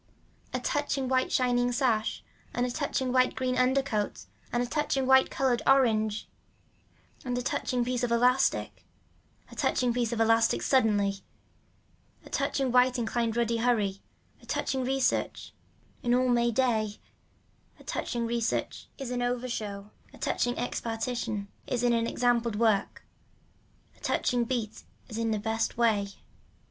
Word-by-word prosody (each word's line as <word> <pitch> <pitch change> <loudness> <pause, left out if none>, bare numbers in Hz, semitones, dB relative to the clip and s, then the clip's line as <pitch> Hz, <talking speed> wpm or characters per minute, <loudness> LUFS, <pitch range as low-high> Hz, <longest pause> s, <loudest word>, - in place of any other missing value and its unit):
A - - -2
touching 290 -3 -1
white 260 0 +1
shining 245 -1 +2
sash 240 -4 0 0.3
and 245 - +1
a 250 - -2
touching 265 -2 -1
white 255 0 +3
green 255 -1 -1
undercoat 255 -4 0 0.3
and 240 0 +1
a - - -1
touching 275 0 0
white 265 0 +5
colored 260 -3 +1
orange 220 -5 +3 1.0
and 245 -1 -2
a 250 - -2
touching 245 -1 -1
piece 250 0 -1
of 245 -1 -1
elastic. 250 +2 +2 0.7
A - - -11
touching 245 -2 +1
piece 240 -1 0
of 235 - -2
elastic 225 0 +3
suddenly. 205 -6 +2 1.1
A - - -13
touching 270 -3 0
white 250 0 +4
inlined 230 -1 -1
ruddy 235 -1 +1
hurry, 215 -5 +1 0.4
a - - -18
touching 265 -1 -1
research 265 +1 -1 0.5
in 240 0 +2
all 255 0 +2
may 240 -1 +3
day. 220 -4 0 0.8
A - - -15
touching 235 -2 -3
research 230 0 -2
is 270 -3 -5
an 245 0 -1
over 245 +1 -1
show. 210 -3 -5 0.2
A - - -14
touching 245 0 0
expartition 230 -3 -3 0.2
is 245 -1 -1
in 240 -1 +3
an 230 0 +1
example 240 -1 +1
of 215 - -5
work, 220 -4 +1 0.9
a - - -24
touching 245 -1 0
beat 230 -3 -3 0.3
is 220 - -5
in 230 0 0
the 215 - +1
best 225 +2 -2
way. 220 -4 +2
240 Hz, 150 wpm, -28 LUFS, 225-255 Hz, 1.1 s, white